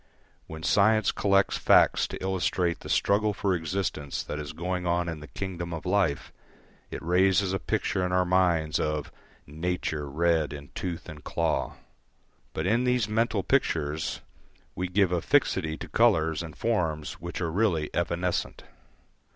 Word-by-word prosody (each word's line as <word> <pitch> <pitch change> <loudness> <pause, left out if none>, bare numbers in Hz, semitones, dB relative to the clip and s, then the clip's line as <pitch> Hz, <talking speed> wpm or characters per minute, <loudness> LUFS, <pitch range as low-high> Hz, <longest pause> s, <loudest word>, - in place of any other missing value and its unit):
When 80 0 -8
science 110 +3 +3
collects 100 -1 +2
facts - - +4
to - - -7
illustrate 90 -2 0
the - - -10
struggle 105 +1 +2
for 100 0 0
existence 80 -4 -2
that 75 - -5
is 75 -1 -5
going 90 +1 -3
on 85 0 +1
in 80 -2 -4
the 75 - -10
kingdom 85 +4 -5
of 80 - -8
life, 90 -6 0 0.6
it - - -5
raises 95 +2 +3
a 95 - 0
picture 95 - -1
in 90 - -1
our 90 0 +2
minds 90 -4 +2
of 75 -1 -2 0.3
"nature 80 -1 -3
red 80 +1 +1
in 70 0 -9
tooth 90 -3 -5
and 75 -4 -10
claw." - - -1 0.8
But - - -3
in 115 +6 +2
these 125 -4 +1
mental 110 -2 0
pictures 80 - 0 0.5
we 90 - -2
give 95 0 +2
a 90 -2 +1
fixity 90 - +1
to - - -7
colours 80 0 +2
and 80 -2 -8
forms 80 -10 -1
which 85 +1 -5
are 85 -3 -1
really 85 -5 +1
evanescent. 85 0 -1
90 Hz, 155 wpm, -27 LUFS, 80-95 Hz, 0.8 s, facts